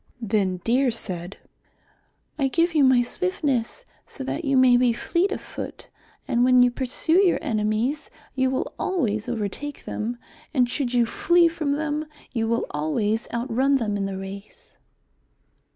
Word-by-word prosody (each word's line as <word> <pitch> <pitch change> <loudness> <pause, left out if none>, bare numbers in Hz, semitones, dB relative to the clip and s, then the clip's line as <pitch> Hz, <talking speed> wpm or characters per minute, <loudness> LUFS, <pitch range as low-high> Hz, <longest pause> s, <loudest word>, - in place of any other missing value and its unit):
Then 200 -4 0
Deer 255 +3 +2
said, 190 -5 -5 1.0
"I 275 - +3
give 335 +5 +1
you 300 -3 +4
my 260 -2 +5
swiftness 295 - -2 0.2
so 270 - -8
that 305 +5 -3
you 275 -3 +2
may 255 -1 +6
be 245 -1 +3
fleet 345 - 0
of - - -2
foot. - - -8 0.4
And 240 0 +2
when 250 0 +6
you 245 - +3
pursue 280 +9 +1
your 360 - +3
enemies 220 +7 -1 0.2
you 260 -1 +1
will 260 - -2
always 235 - -1
overtake 240 +6 -4
them, 235 +3 -3 0.4
and 250 -2 +4
should 250 0 -1
you 240 -1 +4
flee 350 - +3
from 320 -4 -1
them, 300 +1 -2 0.2
you 225 -3 -1
will 230 +1 0
always 205 +10 -1
out 235 +1 -3
run 275 +3 +3
them 220 -6 0
in 200 -1 -1
the 195 -1 -4
race." 195 +2 -10
250 Hz, 160 wpm, -24 LUFS, 220-290 Hz, 1.0 s, may